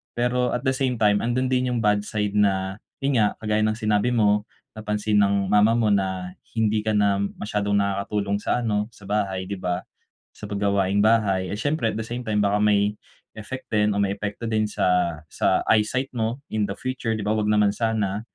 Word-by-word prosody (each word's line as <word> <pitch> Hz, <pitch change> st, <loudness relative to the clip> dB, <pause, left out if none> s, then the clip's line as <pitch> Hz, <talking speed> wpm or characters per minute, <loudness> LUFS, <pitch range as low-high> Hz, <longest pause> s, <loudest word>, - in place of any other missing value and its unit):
Pero 125 Hz, +1 st, 0 dB
at 125 Hz, -, -3 dB
the 130 Hz, -, +2 dB
same 130 Hz, -1 st, 0 dB
time, 105 Hz, -2 st, +3 dB
andun 125 Hz, +2 st, -1 dB
din 125 Hz, 0 st, +1 dB
yung 115 Hz, -, -1 dB
bad 105 Hz, -1 st, +3 dB
side 105 Hz, -1 st, -1 dB
na 95 Hz, -1 st, +1 dB, 0.2 s
yun 135 Hz, -3 st, +2 dB
nga, 105 Hz, -, +1 dB
kagaya 105 Hz, 0 st, +1 dB
ng 110 Hz, 0 st, +1 dB
sinabi 110 Hz, +1 st, +1 dB
mo, 105 Hz, -1 st, +2 dB, 0.2 s
napansin 105 Hz, -1 st, -1 dB
ng 100 Hz, -1 st, +2 dB
mama 105 Hz, +2 st, +5 dB
mo 110 Hz, -3 st, +2 dB
na 95 Hz, -2 st, -1 dB, 0.2 s
hindi 110 Hz, -1 st, +2 dB
ka 105 Hz, 0 st, -1 dB
na 100 Hz, -1 st, +2 dB, 0.2 s
masyadong 105 Hz, -1 st, -1 dB
nakakatulong 100 Hz, 0 st, 0 dB
sa 120 Hz, +3 st, -1 dB
ano, 105 Hz, -2 st, 0 dB
sa 105 Hz, -, -19 dB
bahay, 95 Hz, -2 st, -1 dB
'di 95 Hz, 0 st, -6 dB
ba? 90 Hz, 0 st, -2 dB, 0.5 s
Sa -, -, -18 dB
pag 100 Hz, -1 st, -4 dB
gawaing 100 Hz, -1 st, +1 dB
bahay 100 Hz, -4 st, +2 dB
eh, -, -, -3 dB
siyempre 145 Hz, 0 st, 0 dB
at 110 Hz, -, -4 dB
the 110 Hz, -, -2 dB
same 120 Hz, +2 st, -5 dB
time 105 Hz, -1 st, +1 dB
baka 100 Hz, +1 st, +2 dB
may, 105 Hz, -1 st, +3 dB, 0.4 s
effect 130 Hz, +5 st, -7 dB
din 105 Hz, -1 st, +2 dB
o 100 Hz, -, +1 dB
may 100 Hz, -1 st, +1 dB
epekto 105 Hz, +3 st, -5 dB
din 110 Hz, -1 st, +1 dB
sa 90 Hz, -5 st, +1 dB
sa -, -, +1 dB
eyesight 115 Hz, +5 st, +1 dB
mo 120 Hz, +2 st, -2 dB
in 105 Hz, -1 st, 0 dB
the 100 Hz, -, -3 dB
future, 130 Hz, -3 st, -2 dB
'di 110 Hz, -, -4 dB
ba, 105 Hz, -, 0 dB
'wag 110 Hz, -1 st, 0 dB
naman 105 Hz, -1 st, +3 dB
sana. 105 Hz, -2 st, -1 dB
105 Hz, 205 wpm, -24 LUFS, 100-110 Hz, 0.5 s, mama